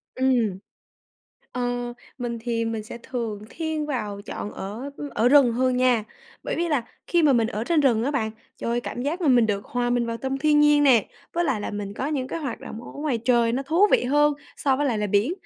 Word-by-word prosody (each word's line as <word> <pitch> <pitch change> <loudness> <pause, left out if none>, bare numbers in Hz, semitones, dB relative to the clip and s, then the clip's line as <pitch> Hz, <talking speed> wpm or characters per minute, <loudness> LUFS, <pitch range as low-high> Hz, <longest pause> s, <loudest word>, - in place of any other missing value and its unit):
Ừm. 240 -7 +1 0.9
Ờ, 245 -1 -2 0.3
mình 235 -2 -3
thì 230 -1 -1
mình 225 -1 -2
sẽ 235 +2 -9
thường 230 -5 -4
thiên 315 -2 -3
vào 210 -8 -3
chọn 210 - -5
ở 220 +8 -6 0.2
ở 225 +3 +3
rừng 270 -3 +6
hơn 255 +1 +1
nha, 250 -3 +3 0.4
bởi - - -2
vì 340 0 0
là 285 -7 +1 0.2
khi 345 -2 +2
mà 295 - +5
mình 230 -3 +3
ở 220 -1 -3
trên 320 +3 +2
rừng 235 -5 +3
á 275 - +1
bạn, 235 -7 -1 0.3
trời - - -3
ơi, 240 +1 +1
cảm 245 - -5
giác 310 +7 -2
mà 330 - +1
mình 245 -3 +5
được 200 -2 -1
hòa 245 0 -1
mình 245 -1 +1
vào 230 0 -3
tâm 265 +3 -3
thiên 300 +1 +4
nhiên 295 0 +5
nè, 250 -7 +5 0.3
với 345 +1 +1
lại 265 -9 0
là - - -4
mình 205 -1 -5
có 260 - -3
những 275 -4 -2
cái - - -3
hoạt 275 -7 -4
động 225 - -8
ở - - -10
ngoài 285 -5 -2
trời 235 -2 +3
nó 265 - -1
thú 330 +9 +4
vị - - +4
hơn 295 +3 +4 0.2
so 270 -2 +1
với 290 +1 0
lại 235 -5 0
là 210 - 0
biển, 205 - +2
245 Hz, 235 wpm, -24 LUFS, 230-285 Hz, 0.9 s, rừng